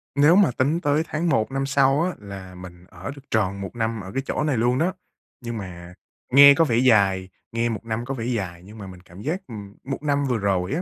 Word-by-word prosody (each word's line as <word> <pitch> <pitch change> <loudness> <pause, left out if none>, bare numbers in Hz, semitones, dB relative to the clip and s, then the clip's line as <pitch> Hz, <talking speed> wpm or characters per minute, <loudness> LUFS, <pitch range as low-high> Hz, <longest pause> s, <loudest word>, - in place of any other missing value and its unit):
Nếu 150 +4 +5
mà 195 -8 +5
tính 140 +7 0
tới 145 +2 +1
tháng 165 +3 -1
1 110 -4 +1
năm 135 0 -1
sau 135 +1 +3
á 185 - 0
là 95 -2 -10
mình 90 -1 -12
ở 95 +5 -7
được 140 - -12
tròn 100 -3 0
1 95 +2 -7
năm 115 -1 -2
ở 95 0 -9
cái 135 +6 -2
chỗ 150 - -2
này 145 -5 0
luôn 120 +3 +2
đó. 175 +5 +1 0.5
Nhưng 120 -1 -5
mà 90 -3 -9 0.4
nghe 140 +1 +10
có 165 +2 +3
vẻ 115 -4 +1
dài, 100 -7 +3 0.2
nghe 115 +1 0
1 115 0 -5
năm 115 +1 -3
có 135 - -4
vẻ 115 -4 -5
dài, 95 -8 -3
nhưng 105 +4 -13
mà 100 -2 -8
mình 90 -1 -12
cảm 90 +2 -14
giác, 165 - -2
ừm, 100 -3 -9
một 135 +2 -5
năm 145 -1 +1
vừa 125 -4 0
rồi 95 -3 -1
á, 170 - -1
115 Hz, 250 wpm, -23 LUFS, 95-140 Hz, 0.5 s, nghe